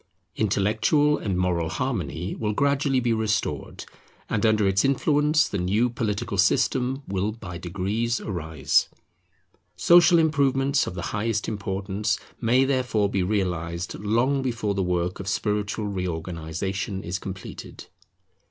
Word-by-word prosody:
Intellectual 110 Hz, -, +2 dB
and 95 Hz, -4 st, -2 dB
moral 90 Hz, -3 st, 0 dB
harmony 85 Hz, +2 st, -3 dB
will 105 Hz, -2 st, -2 dB
gradually 140 Hz, +1 st, +2 dB
be 120 Hz, -2 st, +1 dB
restored, 110 Hz, -2 st, -2 dB, 0.5 s
and 105 Hz, +2 st, +2 dB
under 110 Hz, -2 st, +3 dB
its 95 Hz, 0 st, +2 dB
influence 150 Hz, +3 st, +3 dB
the 100 Hz, -, -3 dB
new 105 Hz, +7 st, +1 dB
political 105 Hz, -3 st, -2 dB
system 130 Hz, +7 st, +2 dB
will 100 Hz, +2 st, -1 dB
by 90 Hz, -6 st, -8 dB
degrees 100 Hz, +7 st, -1 dB
arise. 80 Hz, -7 st, 0 dB, 0.9 s
Social 175 Hz, 0 st, +6 dB
improvements 140 Hz, -3 st, +2 dB
of -, -, -5 dB
the 85 Hz, -, -4 dB
highest 105 Hz, 0 st, -1 dB
importance 100 Hz, 0 st, -2 dB, 0.2 s
may 125 Hz, +3 st, +3 dB
therefore 125 Hz, -6 st, +1 dB
be 95 Hz, -, 0 dB
realized 90 Hz, -3 st, -2 dB
long 120 Hz, +7 st, +1 dB
before 115 Hz, -5 st, -1 dB
the 100 Hz, -, -1 dB
work 90 Hz, 0 st, -1 dB
of 100 Hz, -, -6 dB
spiritual 105 Hz, +1 st, -1 dB
reorganization 90 Hz, +1 st, -3 dB
is 90 Hz, +3 st, -3 dB
completed. 95 Hz, -1 st, -8 dB
105 Hz, 125 wpm, -25 LUFS, 95-125 Hz, 0.9 s, Social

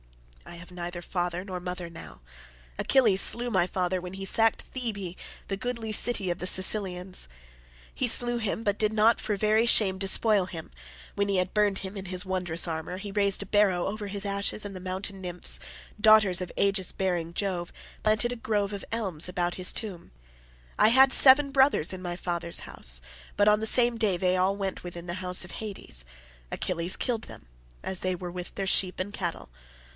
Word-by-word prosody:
I -, -, -10 dB
have 180 Hz, +1 st, -13 dB
neither 175 Hz, 0 st, -6 dB
father 175 Hz, +1 st, -3 dB
nor 185 Hz, -2 st, -5 dB
mother 180 Hz, 0 st, -5 dB
now. 160 Hz, -, -11 dB, 0.6 s
Achilles 220 Hz, -8 st, +3 dB
slew 240 Hz, +1 st, +3 dB
my 185 Hz, -4 st, +2 dB
father 185 Hz, 0 st, -1 dB
when 180 Hz, +1 st, -8 dB
he 195 Hz, 0 st, -6 dB
sacked 225 Hz, +3 st, +3 dB
Thebe 200 Hz, -8 st, -5 dB, 0.3 s
the 195 Hz, -, -2 dB
goodly 230 Hz, 0 st, -4 dB
city 215 Hz, -3 st, 0 dB
of 175 Hz, -, -4 dB
the 180 Hz, -, -3 dB
Cilicians. 185 Hz, -, 0 dB, 0.7 s
He 255 Hz, -, -1 dB
slew 240 Hz, +1 st, +3 dB
him, 220 Hz, 0 st, -3 dB
but 205 Hz, -1 st, -1 dB
did 215 Hz, -1 st, +2 dB
not 220 Hz, +1 st, +3 dB
for 210 Hz, -, -1 dB
very 215 Hz, +3 st, +2 dB
shame 190 Hz, -5 st, +3 dB
despoil 200 Hz, 0 st, +3 dB
him; 165 Hz, -3 st, -9 dB, 0.4 s
when 200 Hz, 0 st, -1 dB
he 195 Hz, -, +1 dB
had 185 Hz, 0 st, -1 dB
burned 205 Hz, -2 st, +1 dB
him 190 Hz, +1 st, -7 dB
in 195 Hz, -1 st, -6 dB
his 185 Hz, +1 st, -3 dB
wondrous 180 Hz, -3 st, 0 dB
armour, 160 Hz, +2 st, -4 dB
he 200 Hz, +1 st, -7 dB
raised 200 Hz, -1 st, +2 dB
a -, -, -11 dB
barrow 195 Hz, -3 st, +2 dB
over 205 Hz, +1 st, -4 dB
his 200 Hz, +1 st, -3 dB
ashes 200 Hz, +1 st, -2 dB
and 200 Hz, -1 st, -7 dB
the -, -, -6 dB
mountain 190 Hz, +1 st, -4 dB
nymphs, 180 Hz, -1 st, 0 dB, 0.4 s
daughters 215 Hz, -5 st, +5 dB
of 180 Hz, -, -5 dB
aegis 195 Hz, -2 st, +1 dB
bearing 175 Hz, -3 st, -2 dB
Jove, 180 Hz, -4 st, -2 dB, 0.3 s
planted 215 Hz, +3 st, +1 dB
a -, -, -3 dB
grove 210 Hz, -3 st, -1 dB
of 200 Hz, -, -6 dB
elms 190 Hz, -8 st, +2 dB
about 175 Hz, -1 st, -2 dB
his 185 Hz, -1 st, +3 dB
tomb. 195 Hz, -, -6 dB, 0.7 s
I -, -, +6 dB
had 265 Hz, +3 st, +6 dB
seven 275 Hz, +1 st, +7 dB
brothers 265 Hz, -, +2 dB
in 185 Hz, -, -7 dB
my 175 Hz, -1 st, -4 dB
father's 170 Hz, -1 st, -2 dB
house, -, -, 0 dB, 0.4 s
but 205 Hz, -, +3 dB
on 210 Hz, 0 st, +5 dB
the 220 Hz, -, +2 dB
same 240 Hz, 0 st, +4 dB
day 210 Hz, -5 st, +1 dB
they 180 Hz, +1 st, +1 dB
all 185 Hz, +2 st, +2 dB
went 195 Hz, -2 st, -4 dB
within 175 Hz, -1 st, -8 dB
the 175 Hz, -, -5 dB
house 180 Hz, 0 st, +2 dB
of 175 Hz, -, -12 dB
Hades. 200 Hz, -, -5 dB, 0.5 s
Achilles 175 Hz, +1 st, -1 dB
killed 230 Hz, -3 st, -1 dB
them -, -, -13 dB, 0.4 s
as 190 Hz, -1 st, -2 dB
they 185 Hz, 0 st, -1 dB
were 175 Hz, 0 st, -7 dB
with 180 Hz, 0 st, -8 dB
their 195 Hz, -1 st, -3 dB
sheep 185 Hz, -1 st, +3 dB
and 195 Hz, +2 st, -4 dB
cattle. 175 Hz, -, -5 dB
190 Hz, 195 wpm, -27 LUFS, 180-215 Hz, 0.7 s, seven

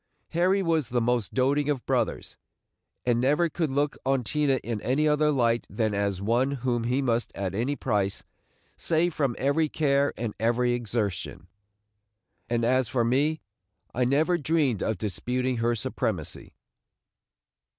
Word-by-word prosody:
Harry 185 Hz, +4 st, +2 dB
was 160 Hz, -7 st, +1 dB
the 120 Hz, -, +1 dB
most 120 Hz, -2 st, 0 dB
doting 140 Hz, +3 st, +1 dB
of 140 Hz, -4 st, -1 dB
brothers, -, -, -1 dB, 0.7 s
and 120 Hz, -1 st, +2 dB
never 150 Hz, +6 st, +2 dB
could 160 Hz, 0 st, -1 dB
look 145 Hz, +1 st, 0 dB
on 135 Hz, -1 st, +1 dB
Tina 145 Hz, +2 st, +1 dB
in 115 Hz, -3 st, -3 dB
any 145 Hz, +5 st, +1 dB
other 150 Hz, 0 st, +3 dB
light 120 Hz, -5 st, +1 dB
than 110 Hz, -3 st, -1 dB
as 100 Hz, -2 st, -1 dB
one 120 Hz, +5 st, +2 dB, 0.2 s
whom 120 Hz, -2 st, 0 dB
he 130 Hz, +3 st, +1 dB
must 120 Hz, -2 st, 0 dB
at 95 Hz, -2 st, -3 dB
any 120 Hz, +8 st, -1 dB
price 100 Hz, -7 st, -1 dB, 0.5 s
save 170 Hz, +1 st, +1 dB
from 140 Hz, -6 st, 0 dB
every 145 Hz, +3 st, +1 dB
care 140 Hz, -2 st, +2 dB
and 115 Hz, -3 st, -3 dB
every 120 Hz, +2 st, +2 dB
exertion; 110 Hz, -8 st, -3 dB, 1.0 s
and 120 Hz, -1 st, +1 dB
as 130 Hz, 0 st, +2 dB
for 120 Hz, -1 st, 0 dB
me, 145 Hz, +6 st, +1 dB, 0.5 s
I 125 Hz, -, +1 dB
never 155 Hz, +7 st, +2 dB
dreamed 145 Hz, -, +1 dB
of 110 Hz, -, -1 dB
disputing 125 Hz, +5 st, -2 dB
her 115 Hz, +1 st, +1 dB
supremacy. 110 Hz, -, -3 dB
125 Hz, 150 wpm, -27 LUFS, 115-145 Hz, 1.0 s, other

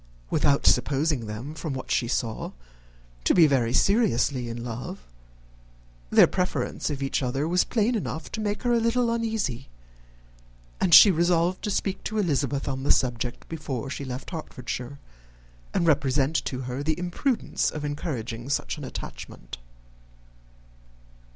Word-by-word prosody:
Without 140 Hz, -1 st, +2 dB
supposing 140 Hz, -4 st, +2 dB
them, 115 Hz, +8 st, -6 dB
from 155 Hz, -2 st, -4 dB
what 130 Hz, -, -6 dB
she 120 Hz, -, +1 dB
saw, 115 Hz, -2 st, -2 dB, 0.7 s
to -, -, +3 dB
be 170 Hz, -, +7 dB
very 130 Hz, -6 st, +2 dB
seriously 140 Hz, -, +2 dB
in 115 Hz, 0 st, -5 dB
love, 125 Hz, -, -6 dB, 1.0 s
their -, -, +7 dB
preference 180 Hz, -3 st, -2 dB
of 140 Hz, -2 st, -3 dB
each 135 Hz, -, 0 dB
other 135 Hz, +4 st, -1 dB
was 180 Hz, +2 st, +3 dB
plain 230 Hz, +1 st, +1 dB
enough 165 Hz, -8 st, -4 dB
to 220 Hz, -, -4 dB
make 205 Hz, +1 st, -2 dB
her 245 Hz, -1 st, +2 dB
a 235 Hz, -, +4 dB
little 230 Hz, +1 st, +1 dB
uneasy; 220 Hz, -, -2 dB, 1.1 s
and 175 Hz, -3 st, +6 dB
she 205 Hz, -, +10 dB
resolved 175 Hz, +1 st, +2 dB
to 210 Hz, -, -1 dB
speak 195 Hz, -1 st, -2 dB
to 215 Hz, -, -3 dB
Elizabeth 140 Hz, -, 0 dB
on 135 Hz, -1 st, -2 dB
the 140 Hz, -, -2 dB
subject 120 Hz, -1 st, 0 dB
before 140 Hz, -5 st, -5 dB
she 140 Hz, -, -4 dB
left 130 Hz, +3 st, -6 dB
Hertfordshire, 135 Hz, -4 st, -6 dB, 0.7 s
and -, -, +1 dB
represent 140 Hz, -2 st, +2 dB
to 130 Hz, -1 st, -3 dB
her 125 Hz, +1 st, -4 dB
the 155 Hz, +2 st, 0 dB
imprudence 180 Hz, +8 st, -1 dB
of 150 Hz, -1 st, -5 dB
encouraging 130 Hz, -6 st, -4 dB
such 65 Hz, -, -1 dB
an -, -, -7 dB
attachment. -, -, -8 dB
145 Hz, 145 wpm, -26 LUFS, 125-180 Hz, 1.1 s, she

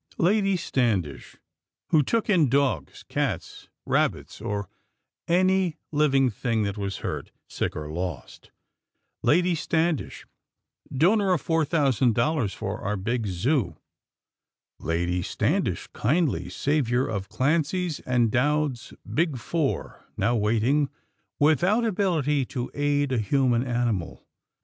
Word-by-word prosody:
Lady 195 Hz, +2 st, +2 dB
Standish, 105 Hz, -, -1 dB, 0.5 s
who 155 Hz, -, +5 dB
took 225 Hz, -, 0 dB
in 170 Hz, -, +4 dB
dogs, 130 Hz, -, 0 dB
cats, -, -, -3 dB, 0.2 s
rabbits -, -, -1 dB
or 100 Hz, -1 st, -3 dB, 0.6 s
any 185 Hz, -1 st, +2 dB
living 140 Hz, -4 st, +3 dB
thing 115 Hz, 0 st, -1 dB
that 100 Hz, -1 st, -2 dB
was 100 Hz, -2 st, -3 dB
hurt, -, -, -4 dB, 0.2 s
sick -, -, -3 dB
or 75 Hz, -1 st, -5 dB
lost; 85 Hz, -4 st, -6 dB, 0.7 s
Lady 175 Hz, +3 st, +3 dB
Standish, 160 Hz, 0 st, -1 dB, 0.7 s
donor 190 Hz, +8 st, +3 dB
of 175 Hz, -, 0 dB
four 165 Hz, -2 st, +1 dB
thousand 135 Hz, -7 st, +2 dB
dollars 135 Hz, -4 st, +1 dB
for 100 Hz, 0 st, -5 dB
our 105 Hz, +1 st, -2 dB
big 115 Hz, +3 st, -2 dB
Zoo; 100 Hz, -, 0 dB, 1.0 s
Lady 85 Hz, +2 st, -1 dB
Standish, -, -, -1 dB
kindly 150 Hz, +5 st, 0 dB
savior 130 Hz, -4 st, +1 dB
of 100 Hz, -2 st, -4 dB
Clancy's 160 Hz, +4 st, 0 dB
and 120 Hz, -3 st, +1 dB
Dowd's 145 Hz, 0 st, 0 dB
"Big 155 Hz, -4 st, 0 dB
Four," 150 Hz, +3 st, -2 dB
now 120 Hz, -, +2 dB
waiting, 115 Hz, +7 st, +2 dB, 0.5 s
without 175 Hz, -, +3 dB
ability 165 Hz, -, +1 dB
to 125 Hz, 0 st, -5 dB
aid 145 Hz, -1 st, +1 dB
a 125 Hz, -, +1 dB
human 120 Hz, +2 st, +2 dB
animal. 120 Hz, -8 st, -2 dB
135 Hz, 115 wpm, -25 LUFS, 110-160 Hz, 1.0 s, who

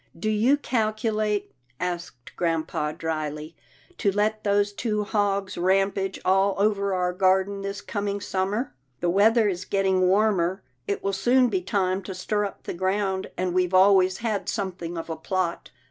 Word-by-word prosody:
" -, -, -19 dB
Do 215 Hz, +5 st, 0 dB
you 235 Hz, +7 st, +3 dB
calculate," 215 Hz, -4 st, -1 dB, 0.3 s
asked 170 Hz, -9 st, -5 dB
grampa, 160 Hz, -3 st, -1 dB
dryly, 155 Hz, 0 st, -4 dB, 0.2 s
" 360 Hz, -, -29 dB
to 200 Hz, -, +2 dB
let 215 Hz, +2 st, 0 dB
those 205 Hz, 0 st, +2 dB
two 210 Hz, -1 st, -1 dB
hogs 200 Hz, -3 st, -1 dB
rampage 195 Hz, +1 st, +1 dB
all 195 Hz, +1 st, +3 dB
over 200 Hz, -1 st, +1 dB
our 180 Hz, 0 st, 0 dB
garden 190 Hz, +2 st, +2 dB
this 200 Hz, +1 st, -4 dB
coming 205 Hz, -1 st, -3 dB
summer? 200 Hz, +6 st, -2 dB, 0.3 s
The 175 Hz, -, +1 dB
weather 220 Hz, +4 st, +4 dB
is 185 Hz, -2 st, -2 dB
getting 190 Hz, -1 st, +1 dB
warmer. 190 Hz, -2 st, +2 dB, 0.2 s
It 200 Hz, -, -2 dB
will 195 Hz, -, 0 dB
soon 245 Hz, +6 st, +3 dB
be 190 Hz, -4 st, 0 dB
time 185 Hz, 0 st, 0 dB
to 190 Hz, 0 st, -7 dB
stir 205 Hz, +3 st, -1 dB
up 200 Hz, -, -8 dB
the -, -, -5 dB
ground, 190 Hz, +1 st, -1 dB
and 180 Hz, -1 st, -1 dB
we've 185 Hz, 0 st, +1 dB
always 190 Hz, -1 st, +5 dB
had 220 Hz, -4 st, -2 dB
something 180 Hz, -4 st, -4 dB
of 165 Hz, -, -5 dB
a 165 Hz, -, -3 dB
plot." 175 Hz, +2 st, -2 dB
195 Hz, 165 wpm, -25 LUFS, 185-205 Hz, 0.3 s, always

